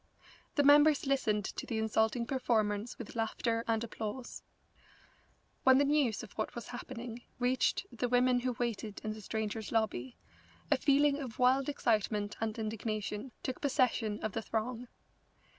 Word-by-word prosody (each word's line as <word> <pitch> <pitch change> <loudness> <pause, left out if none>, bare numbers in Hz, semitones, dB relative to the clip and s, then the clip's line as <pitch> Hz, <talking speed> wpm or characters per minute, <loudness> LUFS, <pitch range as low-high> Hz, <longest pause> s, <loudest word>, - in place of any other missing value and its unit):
The 290 - +4
members 290 +1 +6
listened 215 -7 +1
to - - -5
the 225 - -2
insulting 220 +2 +1
performance 225 -4 0
with 235 -1 -8
laughter 230 0 -1
and 225 0 +1
applause. 230 +2 -5 1.2
When 260 0 +7
news 280 -5 +2
of 210 - -10
what 215 - -4
was 235 -3 -7
happening 245 -1 -7 0.2
reached 255 +1 +1
the 245 +1 -2
women 250 0 +4
who 250 0 -1
waited 225 -3 -3
in 215 -1 -2
the 215 - -9
Strangers' 220 +1 -3
Lobby, 205 - -1 0.5
a 290 - +5
feeling 285 +1 +3
of 250 -6 -6
wild 260 +2 +3
excitement 215 -6 0
and 220 -1 -1
indignation 215 +1 -3
took 260 - -4
possession 250 -6 +1
of 215 - -1
the 225 - -3
throng. 230 +3 -3
230 Hz, 145 wpm, -33 LUFS, 215-255 Hz, 1.2 s, When